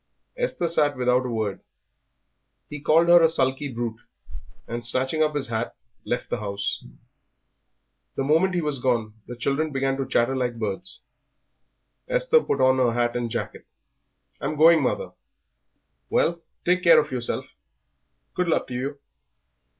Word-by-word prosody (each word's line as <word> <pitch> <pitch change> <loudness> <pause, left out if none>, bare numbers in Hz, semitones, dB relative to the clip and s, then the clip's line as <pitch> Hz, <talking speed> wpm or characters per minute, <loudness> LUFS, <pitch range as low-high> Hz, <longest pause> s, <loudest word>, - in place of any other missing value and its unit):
Esther - - -1
sat 150 -4 +2
without 125 0 +2
a - - -4
word. 110 -4 -2 1.1
He 150 - -5
called 160 +3 +3
her 175 0 +8
a 165 - +5
sulky 135 -1 0
brute, 115 -1 -4 0.7
and, 120 0 -5
snatching 130 +6 0
up 155 -1 +1
his 135 -4 -1
hat, 115 +1 -3 0.3
left 120 - -3
the - - -1
house. 100 -1 -3 1.3
The 135 - -1
moment 165 +6 +2
he 175 - +1
was 150 -3 0
gone 120 -4 0
the 120 - -7
children 140 +6 -1
began 135 0 -1
to 135 -2 -3
chatter 120 +3 +1
like 125 -2 -2
birds. 110 - -4 1.1
Esther - - +3
put 140 - -2
on 130 0 +4
her 120 -2 +2
hat 120 0 0
and 120 -1 -2
jacket. 115 0 -5 0.7
"I'm 155 - -3
going, 160 +1 +6
mother." 130 - -1 1.0
"Well, 170 0 +1 0.2
take 180 +1 +2
care 170 -2 +7
of 150 - -2
yourself. 125 -2 -4 0.8
Good 180 -1 -1
luck 165 - +1
to - - -6
you." 135 +3 -3
135 Hz, 150 wpm, -24 LUFS, 120-155 Hz, 1.3 s, her